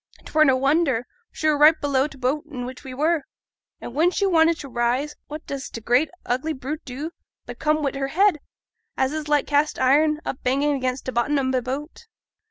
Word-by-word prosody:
'Twere 310 0 +3
no 265 -2 +4
wonder, 275 -3 +2 0.2
for - - -34
she 310 - 0
were 305 - +4
right 310 +2 +7
below 280 -1 +1
t' 275 - -14
boat 270 +4 -1
in 250 -5 -5
which 255 +2 -9
a 265 -2 -8
were; 315 +3 +1 0.6
and - - -8
when 320 +6 +3
she 400 +2 0
wanted 330 -3 +3
to 285 - -7
rise, 250 +4 -1
what 305 +1 -8
does 275 -1 -5
t' - - -7
great 245 +7 +2 0.2
ugly 260 +6 -1
brute 290 +3 -5
do 285 +5 -5 0.3
but - - -9
come 305 0 +1
wi' 275 - +1
her 275 0 -2
head, 365 +2 +3 0.6
as 265 +2 +1
is 310 -1 -4
like 295 -1 +2
cast 295 +1 +1
iron, 300 +4 +3
up 265 - -4
bang 265 +3 +1
again 265 -4 0
t' 260 0 -6
bottom 255 +5 +1
o' 260 -1 0
t' 260 - +2
boat. 285 - -6
285 Hz, 215 wpm, -23 LUFS, 260-310 Hz, 0.6 s, right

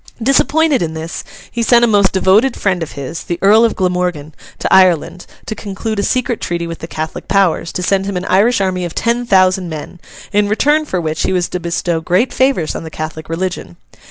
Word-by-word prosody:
Disappointed 275 +3 +2
in 160 -2 -2
this, 160 +1 -6 0.3
he 235 - -3
sent 235 +1 +5
a - - +1
most 200 -3 +3
devoted 200 +7 +3
friend 190 -3 0
of 165 - -5
his, 140 +3 -6
the 175 - -3
Earl 215 +3 +5
of 230 - +2
Glamorgan, 180 -5 -1 0.2
to - - -1
Ireland, 180 -1 +3 0.2
to - - -4
conclude 210 +1 -4
a - - 0
secret 250 0 -1
treaty 170 -1 -2
with 165 0 -6
the 165 - -7
Catholic 160 -1 -6
powers, 185 -4 +1
to 180 - -3
send 195 +1 +1
him 200 -2 -2
an 180 - -4
Irish 210 +4 +3
army 185 -1 -1
of 175 - -5
ten 235 +1 0
thousand 185 -2 +3
men; 160 +3 -8 0.3
in 205 0 +2
return 295 +8 +2
for 185 -11 -2
which 160 -2 -3
he - - 0
was 180 -1 0
to 180 - -3
bestow 170 -1 -2
great 185 +10 +1
favours 260 - +1
on - - -6
the 160 - -7
Catholic 155 0 -6
religion. 165 - -4
185 Hz, 215 wpm, -16 LUFS, 170-220 Hz, 0.3 s, sent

